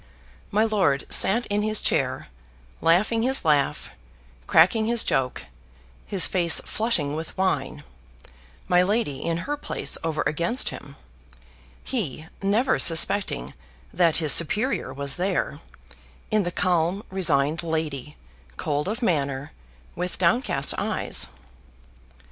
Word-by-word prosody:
My 210 +2 +2
lord 190 -11 +1
sat 230 +5 +2
in 205 0 -1
his 215 0 +2
chair, - - -1 0.5
laughing 205 +7 +3
his 260 -3 +2
laugh, 150 -3 +1 0.6
cracking 215 +7 +4
his 235 -1 +3
joke, 125 -1 -1 0.6
his 190 -4 +4
face 175 -3 +3
flushing 195 -11 0
with 160 +4 -7
wine 190 0 -1 0.8
my 180 0 +4
lady 185 - -1
in 165 0 -1
her 295 - -2
place 290 - -3
over 160 -1 -1
against 170 - 0
him 140 -1 -10 0.9
he 160 - -3 0.2
never 210 +7 +2
suspecting 165 - +2 0.4
that 170 -2 +3
his 155 -4 +4
superior 210 - +1
was 140 0 -2
there, 185 +3 -1 0.7
in 215 0 +3
the 175 -2 -2
calm 180 +2 0
resigned 155 -5 +1
lady, 155 -4 -4 0.4
cold 150 +2 -2
of 225 +5 -3
manner, 140 -5 -1 0.4
with 180 +1 -3
downcast 170 - +1
eyes. - - 0
175 Hz, 120 wpm, -24 LUFS, 150-210 Hz, 0.9 s, cracking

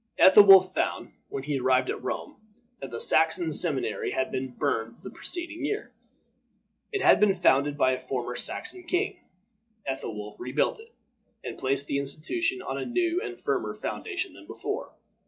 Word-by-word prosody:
Ethelwolf 190 -1 +8
found, - - -2 0.2
when 135 - -5
he 145 -1 -2
arrived 130 0 +2
at - - -7
Rome, - - -5 0.4
that 135 - -7
the 120 -1 -6
Saxon 160 +1 +3
seminary 150 -3 +1
had 130 - -1
been 130 0 -3
burned 115 -2 -2
the 195 - -10
preceding 340 -2 -4
year. 420 +8 -3 1.0
It 405 -2 -2
had - - +6
been 205 -2 +4
founded 145 -5 +2
by 130 -3 +3
a 130 - -2
former 125 -1 -4
Saxon 360 +1 -1
king. 365 +3 -1 0.7
Ethelwolf 105 -6 -5
rebuilt 130 - -1
it, 455 +1 -15 0.5
and - - -6
placed 135 +1 -1
the 140 - -1
institution 330 - -1
on 135 - -4
a - - -3
new 345 +6 0
and - - -6
firmer - - -2
foundation 380 -3 -4
than - - -15
before. 425 +4 -5
155 Hz, 160 wpm, -27 LUFS, -, 1.0 s, Ethelwolf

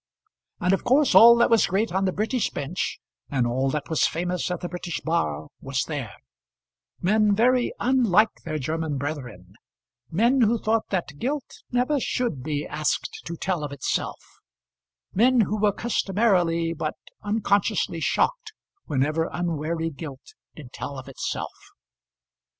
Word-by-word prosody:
And 180 +1 +2
of 195 - 0
course 275 +3 +3
all 235 +1 +9
that 235 0 +3
was 230 - +5
great 205 +3 0
on 190 +2 +1
the 185 - +1
British 220 +4 0
bench, 150 +7 -3 0.3
and 130 -4 +1
all 130 +3 0
that 145 +1 -3
was 160 - +2
famous 180 +3 -2
at 180 -1 -3
the 175 - -3
British 175 -1 -4
bar 80 - -1
was 135 -1 -1
there, 135 -9 -5 0.9
men 210 +2 +3
very 245 +3 +3
unlike 225 -5 +3
their 155 -2 -3
German 155 +1 -2
brethren, 125 - -6 0.6
men 235 +9 +3
who 230 +1 +4
thought 220 0 0
that 170 -7 -3
guilt 280 +2 -4
never 255 +4 +1
should 235 - -1
be 145 +1 -2
asked 155 -1 -2
to 170 - -5
tell 175 -3 -1
of 145 - -4
itself, 140 -2 -2 1.0
men 245 +4 +4
who 210 0 -1
were 210 -1 +4
customarily 185 -6 +1
but 155 -1 -3 0.3
unconsciously 205 -4 0
shocked 450 - 0 0.3
whenever 155 +4 0
unwary 165 -1 -2
guilt 140 -3 -9 0.2
did 135 -5 -12
tell 140 - -6
of 130 0 -9
itself. 135 - -4
175 Hz, 145 wpm, -25 LUFS, 150-220 Hz, 1.0 s, all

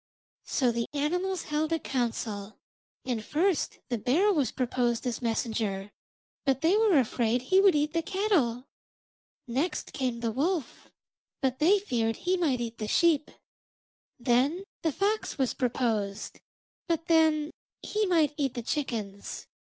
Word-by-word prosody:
So 250 -3 +1
the 235 0 -2
animals 360 +5 -1
held 305 +1 -1
a 330 - +2
council, 225 -7 -3 0.5
and 240 -4 -2
first 330 - 0
the 240 -2 -1
bear 335 - +3
was 285 - +1
proposed 245 -1 0
as 245 0 -2
messenger, 220 -4 -2 0.5
but 270 -2 +1
they 330 +5 +4
were 430 -6 +4
afraid 240 -1 +1
he 375 +8 +4
would 390 -5 +5
eat 300 +1 +1
the 335 - +1
cattle. 325 - 0 0.8
Next 270 +9 -2
came 250 -3 -2
the 230 -1 0
wolf, 300 - -2 0.5
but 265 -1 -1
they 355 +7 +5
feared 230 - -1
that - - -15
he 365 +1 +1
might 295 -9 +1
eat 230 -1 -5
the 215 - -3
sheep. 315 +2 +3 0.9
Then 265 +9 +2 0.2
the 325 - +1
fox 410 +7 -1
was 265 -3 +1
proposed, 220 -5 -1 0.5
but 330 -1 -1
then 315 -2 +3 0.3
he 425 -1 0
might 320 -5 +3
eat 270 -3 0
the 240 - -4
chickens. 220 -8 -4
270 Hz, 145 wpm, -28 LUFS, 235-330 Hz, 0.9 s, would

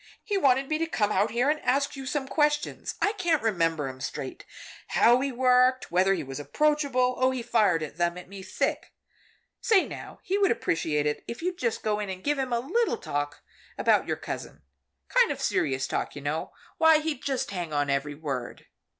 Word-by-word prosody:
He 415 - -2
wanted 270 -7 +3
me 310 +1 -1
to 330 - 0
come 210 -9 0
out 205 +3 +2
here 240 +4 +1
and 305 - -2
ask 280 +1 0
you 270 -1 -7
some 270 0 -2
questions 295 0 0
I 410 - +2
can't 345 - +1
remember 165 -9 +1
'em 130 0 -8
straight. - - -6 0.4
How 240 +2 +4
he 275 0 -1
worked 255 -1 +3
whether 190 +2 +3
he 165 - -4
was 135 +1 -7
approachable. 275 - +1
Oh, 255 0 +4
he 260 -2 -3
fired 205 -8 +2
them 170 +3 -2
at 180 - -9
me 195 +1 -9
thick. - - -2 0.7
Say 410 -4 +3
now, - - -9
he 390 +2 0
would 395 - +4
appreciate 160 -8 0
it, 150 0 -1
if 235 +7 -6
you'd 360 0 -2
just 235 -2 -1
go 210 -1 0
in 205 -2 -3
and 185 0 -6
give 290 -1 0
him 260 -2 -2
a 235 - +1
little 435 - 0
talk 145 0 -4 0.3
about - - +3
your - - -1
cousin. 70 0 -7 0.4
Kind - - +4
of - - -4
serious 135 -1 0
talk, - - -3
you 145 - -7
know. 150 +3 -2 0.3
Why, 320 -1 +7
he'd 305 -4 -3
just 270 -6 -2
hang 175 -4 -4
on 145 -1 0
every 140 +1 -1
word." 140 -5 -5
235 Hz, 200 wpm, -27 LUFS, -, 0.7 s, Why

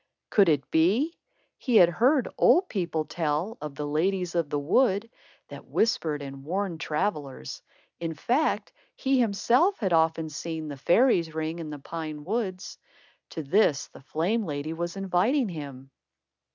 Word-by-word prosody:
Could 200 -4 +5
it 145 -4 0
be? 210 - +2 0.4
He 250 -4 0
had 175 -5 +8
heard 255 - +2
old 365 +1 +4
people 170 -5 -2
tell 160 +7 -2
of 150 -2 -6
the 150 - -4
ladies 180 +4 0
of 170 -4 0
the 145 - -1
wood, 200 - +2 0.4
that - - -10
whispered 155 -10 0
and 135 -1 -8
warned 180 +1 -2
travellers. 150 - -3 0.4
In 165 -1 -3
fact, 255 - 0 0.2
he 265 -1 +1
himself 245 - +2
had 190 -5 -1
often 160 0 +2
seen 160 0 -5
the 145 - -5
"fairies' 170 - +3
ring" 160 +1 -3
in 160 -2 -6
the 150 - -6
pine 155 0 -6
woods. 190 0 -3 0.5
To 160 - -5
this, 150 -2 +2
the - - -15
flame 175 - -1
lady 150 -2 -4
was 170 +3 -4
inviting 195 +7 +1
him. 140 -5 -8
170 Hz, 150 wpm, -27 LUFS, 150-210 Hz, 0.5 s, had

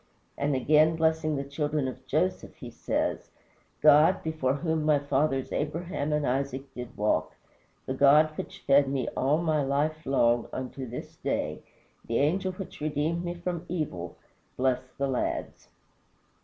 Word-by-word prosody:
And 140 0 0
again, 155 +5 +4
blessing 160 -1 +1
the 140 - -2
children 145 0 -1
of 130 0 -8
Joseph, 170 +7 -1
he - - -9
says: - - -2 0.5
"God, 150 +1 +6
before 155 -5 0
whom 160 +1 -1
my 150 -1 +4
fathers 140 -1 0
Abraham 155 0 -2
and 150 -1 +1
Isaac 135 +1 -2
did 125 -1 -8
walk, 105 +1 0 0.5
the 130 - -2
God 150 +3 +5
which - - -7
fed 140 0 +4
me 135 -3 -1
all 140 +4 +1
my 160 -3 +1
life 150 +3 0
long 120 -3 +3
unto 130 0 -5
this 120 - -8
day, - - -2 0.4
the 115 - -1
Angel 185 +6 +1
which 185 -4 -9
redeemed 155 +3 -1
me 175 0 -3
from 175 0 -3
all 170 - -15
evil, 140 - -4 0.4
bless 130 -1 +1 0.2
the 140 - 0
lads." 130 -2 -3
145 Hz, 155 wpm, -28 LUFS, 135-155 Hz, 0.5 s, God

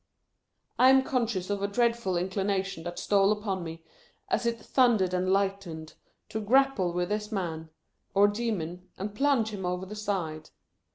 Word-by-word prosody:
I 255 - +7
am 265 0 +6
conscious 225 -8 -1
of 200 -1 -1
a 200 - +1
dreadful 230 -3 +1
inclination 190 -1 -1
that 175 0 -5
stole 200 0 +3
upon 205 -3 -2
me, 165 0 -8 0.5
as 300 -10 +1
it 230 0 -1
thundered 225 -7 +2
and 185 +1 +1
lightened, 195 -5 -1 0.4
to 220 - -3
grapple 240 -5 +3
with 175 0 -1
this 210 +1 -2
man, 165 -5 -3 0.5
or 200 +1 +6
demon, 190 -5 -3
and 200 +2 -4
plunge 265 -2 +2
him 205 -3 -6
over 180 +1 -2
the 210 +3 -8
side. 180 -7 -3
200 Hz, 160 wpm, -28 LUFS, 180-220 Hz, 0.5 s, I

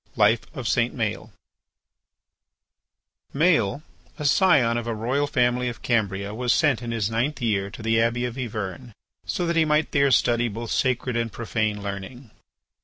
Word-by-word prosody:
LIFE - - +3
OF - - -4
SAINT - - +1
MAËL - - -2 2.1
Maël, 150 - +2 0.3
a 150 - -5
scion 140 -7 +4
of 120 0 -3
a 115 - -2
royal 130 +7 0
family 125 -2 +1
of 120 - -9
Cambria, 100 -4 -1
was 120 +2 0
sent 145 -7 +2
in 120 - -5
his 115 -2 -1
ninth 125 +7 -1
year 100 -5 0
to 110 - -10
the 115 0 +2
Abbey 120 +2 0
of 120 -1 -4
Yvern 115 -1 -5 0.3
so 180 - -1
that 170 0 0
he 165 - +4
might 150 0 +1
there 140 -1 +3
study 120 -1 +3
both 115 +1 -6
sacred 125 -1 0
and 115 -1 -1
profane 110 -2 -2
learning. 100 +5 -7
120 Hz, 165 wpm, -24 LUFS, 110-135 Hz, 2.1 s, scion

